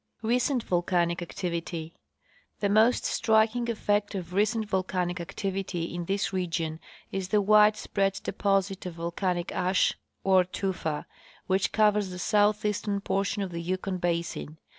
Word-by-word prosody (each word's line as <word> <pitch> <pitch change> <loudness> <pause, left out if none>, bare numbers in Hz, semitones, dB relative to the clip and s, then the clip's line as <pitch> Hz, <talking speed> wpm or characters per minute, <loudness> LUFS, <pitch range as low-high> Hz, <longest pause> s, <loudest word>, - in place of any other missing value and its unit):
Recent 245 +2 +1
volcanic 175 -1 +1
Activity. 170 -2 -4 0.7
The 200 - +1
most 220 +4 +4
striking 225 +2 +2
effect 205 -2 0
of 180 -2 -5
recent 215 +2 +1
volcanic 185 -2 -1
activity 190 -1 -3
in 175 0 -4
this 195 +2 -1
region 165 -3 -2 0.3
is 195 -1 -2
the 210 +2 +3
wide 210 +1 +5
spread 195 -2 0
deposit 195 -1 0
of 175 - -7
volcanic 175 +1 -2
ash, 185 +1 +2 0.3
or 190 -1 +5
tufa, 180 -4 -3 0.4
which 190 0 +1
covers 210 -2 +3
the 180 - -7
southeastern 210 +1 +1
portion 200 +1 -1
of 190 - -5
the 170 0 -4
Yukon 185 +2 -2
basin. 170 -3 -2
190 Hz, 135 wpm, -28 LUFS, 175-210 Hz, 0.7 s, wide